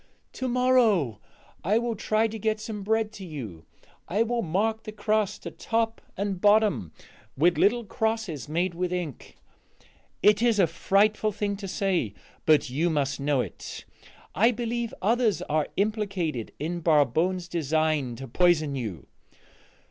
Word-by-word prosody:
"To 260 Hz, -, -3 dB
morrow 240 Hz, -, +3 dB, 0.4 s
I 205 Hz, +6 st, +3 dB
will 235 Hz, -1 st, -1 dB
try 215 Hz, +1 st, +1 dB
to 220 Hz, 0 st, -7 dB
get 215 Hz, +1 st, 0 dB
some 215 Hz, -1 st, -5 dB
bread 220 Hz, +1 st, 0 dB
to 205 Hz, -4 st, -10 dB
you; 115 Hz, -, -8 dB, 0.4 s
I 205 Hz, +6 st, +2 dB
will 235 Hz, +1 st, -1 dB
mark 215 Hz, +5 st, 0 dB
the 215 Hz, -, -7 dB
crust 215 Hz, -1 st, -1 dB
at -, -, -8 dB
top 225 Hz, 0 st, -1 dB, 0.2 s
and 195 Hz, -2 st, -2 dB
bottom 210 Hz, -, +3 dB, 0.5 s
with 170 Hz, +5 st, +3 dB
little 235 Hz, +3 st, +3 dB
crosses 215 Hz, -, -2 dB
made 175 Hz, +3 st, 0 dB
with 180 Hz, +1 st, -2 dB
ink. 175 Hz, -7 st, -5 dB, 0.9 s
It 210 Hz, +1 st, +5 dB
is 235 Hz, -3 st, +3 dB
a 190 Hz, -, +5 dB
frightful 205 Hz, +6 st, +2 dB
thing 205 Hz, 0 st, -2 dB
to 195 Hz, -1 st, -6 dB
say, 180 Hz, -, -1 dB, 0.3 s
but 155 Hz, -1 st, +5 dB
you 150 Hz, +7 st, 0 dB
must 145 Hz, -4 st, 0 dB
know 140 Hz, -1 st, +1 dB
it: -, -, -7 dB, 0.5 s
I 210 Hz, +10 st, +4 dB
believe 235 Hz, 0 st, -2 dB
others 225 Hz, -3 st, +2 dB
are 155 Hz, 0 st, 0 dB
implicated 195 Hz, -, -1 dB
in 170 Hz, +3 st, -3 dB
Barbone's 165 Hz, +3 st, +2 dB
design 155 Hz, -5 st, 0 dB
to 135 Hz, +3 st, -8 dB
poison 155 Hz, 0 st, +2 dB
you. 105 Hz, -, -5 dB
195 Hz, 150 wpm, -26 LUFS, 155-220 Hz, 0.9 s, It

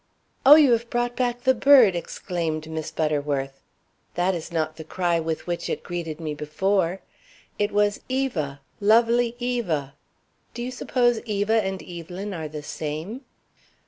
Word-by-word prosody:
"Oh, 290 Hz, -, +12 dB
you 295 Hz, -5 st, +6 dB
have 235 Hz, 0 st, +1 dB
brought 240 Hz, 0 st, -1 dB
back 245 Hz, -1 st, -1 dB
the 260 Hz, -, +5 dB
bird!" 250 Hz, -6 st, +6 dB
exclaimed 165 Hz, -2 st, -3 dB
Miss 160 Hz, -1 st, -4 dB
Butterworth. 145 Hz, -4 st, -2 dB, 0.5 s
"That 180 Hz, +2 st, +1 dB
is 170 Hz, 0 st, -5 dB
not 155 Hz, -2 st, -1 dB
the 160 Hz, -, -7 dB
cry 170 Hz, +1 st, 0 dB
with 160 Hz, -1 st, -3 dB
which 175 Hz, -1 st, -3 dB
it -, -, -3 dB
greeted 170 Hz, -3 st, -5 dB
me 155 Hz, -2 st, -3 dB
before. 180 Hz, +5 st, 0 dB, 0.6 s
It 205 Hz, 0 st, +1 dB
was 205 Hz, 0 st, +2 dB
'Eva! 170 Hz, -, -2 dB, 0.2 s
Lovely 230 Hz, +3 st, +3 dB
Eva!' 215 Hz, -, -2 dB, 0.6 s
Do 240 Hz, -, -4 dB
you 250 Hz, -, -4 dB
suppose 245 Hz, -2 st, +1 dB
Eva 215 Hz, 0 st, +1 dB
and 190 Hz, -1 st, -4 dB
Evelyn 180 Hz, +3 st, -7 dB
are 160 Hz, -3 st, -4 dB
the 150 Hz, 0 st, -7 dB
same?" 160 Hz, -, -5 dB
185 Hz, 150 wpm, -24 LUFS, 160-235 Hz, 0.6 s, Oh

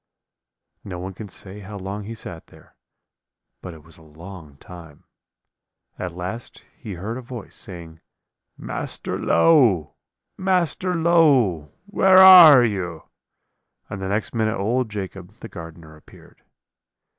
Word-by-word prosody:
"No 95 Hz, -3 st, -8 dB
one 95 Hz, +2 st, -7 dB
can 105 Hz, +3 st, -10 dB
say 95 Hz, +1 st, -11 dB
how 100 Hz, +1 st, -10 dB
long 100 Hz, +2 st, -7 dB
he 115 Hz, +2 st, -8 dB
sat 85 Hz, -6 st, -11 dB
there, -, -, -21 dB, 0.9 s
but 90 Hz, -3 st, -9 dB
it 75 Hz, -, -16 dB
was 80 Hz, +1 st, -16 dB
a -, -, -19 dB
long 80 Hz, -1 st, -13 dB
time; 80 Hz, -2 st, -14 dB, 1.0 s
at 90 Hz, -, -5 dB
last 95 Hz, +7 st, -8 dB
he 105 Hz, -, -9 dB
heard 105 Hz, +8 st, -6 dB
a -, -, -9 dB
voice, 120 Hz, -3 st, -10 dB
saying, 85 Hz, -3 st, -10 dB, 0.6 s
'Master -, -, -6 dB
Low! 100 Hz, -, +3 dB, 0.5 s
Master 185 Hz, -1 st, -1 dB
Low! 140 Hz, -, +2 dB
where 190 Hz, -2 st, +3 dB
are 175 Hz, -9 st, +9 dB
you?' 90 Hz, -7 st, -5 dB, 0.8 s
and 100 Hz, -, -6 dB
the 95 Hz, -, -4 dB
next 105 Hz, +2 st, -3 dB
minute 110 Hz, -1 st, -1 dB
old 115 Hz, +5 st, -1 dB
Jacob, 95 Hz, -3 st, -8 dB
the -, -, -9 dB
gardener, 80 Hz, -1 st, -12 dB
appeared. 75 Hz, -, -20 dB
100 Hz, 135 wpm, -21 LUFS, 85-120 Hz, 1.0 s, are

